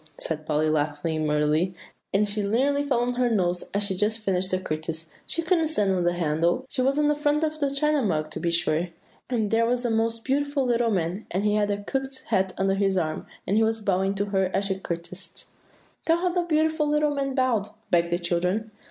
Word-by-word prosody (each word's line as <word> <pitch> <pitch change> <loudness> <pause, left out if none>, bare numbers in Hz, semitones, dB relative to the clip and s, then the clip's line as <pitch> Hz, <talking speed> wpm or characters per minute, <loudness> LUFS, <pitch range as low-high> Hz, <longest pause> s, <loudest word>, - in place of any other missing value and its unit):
said 155 -1 -3
Polly, 155 0 +1
laughing 155 +1 0
merrily; 150 +5 +1 0.4
and 205 +2 +2
she 205 +1 +1
nearly 265 +8 +1
fell 270 -4 +1
on 245 0 0
her 245 0 +1
nose, 180 -5 0
as 200 +1 +1
she 200 -1 +2
was 185 - -5
just 215 +2 +2
finishing 185 -3 0
the 185 - -9
courtesy; 160 +1 -4 0.2
"she 330 - +2
couldn't 330 -2 +2
stand 210 -11 +1
on 185 -2 +1
the 175 - +2
handle. 170 +7 0
She - - 0
was 270 +2 +2
on 300 0 +3
the 295 - +4
front 295 +1 +1
of 310 0 -1
the 285 -2 +1
China 295 +1 +1
Mug, 155 -8 -1
to - - -4
be 170 - 0
sure; 170 0 +1 0.4
and 220 -5 0
there 230 +1 +3
was 245 +1 0
a 240 - +1
most 225 0 0
beautiful 285 0 0
little 240 -1 +2
man, 185 0 -1
and 190 +3 -1
he 210 0 +2
had 210 -1 +2
a 205 0 -2
cocked 270 +3 -3
hat 190 -4 +2
under 195 0 +2
his 195 -1 +1
arm, 155 -3 -2 0.2
and 200 - +1
he 225 - +4
was 225 0 +1
bowing 195 -1 0
to 200 +1 0
her 190 -1 +2
as 200 - +1
she 190 -1 -2
courtesied." 175 +1 -5 0.6
"Tell 330 0 +4
how 360 +1 0
the 355 0 +1
beautiful 315 -2 +1
little 300 0 +2
man 275 -1 -2
bowed," 250 -6 +1 0.2
begged 170 -1 +3
the 175 - +1
children. 180 +5 -1
205 Hz, 230 wpm, -25 LUFS, 175-265 Hz, 0.6 s, the